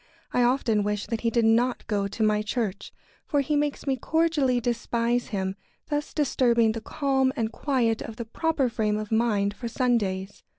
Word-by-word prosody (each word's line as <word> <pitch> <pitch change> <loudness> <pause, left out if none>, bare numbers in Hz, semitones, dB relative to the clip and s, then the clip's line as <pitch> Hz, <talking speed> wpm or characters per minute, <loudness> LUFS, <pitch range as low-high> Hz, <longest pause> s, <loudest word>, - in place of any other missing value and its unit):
I 250 - +3
often 240 -3 +2
wish 205 0 -1
that 230 -2 -3
he 230 - +2
did 230 0 +2
not 240 +3 +2
go 205 -2 0
to 210 +3 -3
my 210 0 +3
church, 210 -2 -3 0.4
for 290 - +2
he 295 +2 -1
makes 290 0 -1
me 270 -2 0
cordially 300 -3 +1
despise 235 0 0
him, 190 -2 -2 0.4
thus 295 0 -1
disturbing 240 -6 +2
the 225 0 -5
calm 265 +1 +1
and 225 -4 -1
quiet 235 -4 0
of 225 - -6
the 235 0 -5
proper 295 +3 0
frame 215 -3 0
of 215 0 -5
mind 215 -3 +2
for 235 +3 -6
Sundays. 205 -6 -1
235 Hz, 180 wpm, -26 LUFS, 215-260 Hz, 0.4 s, I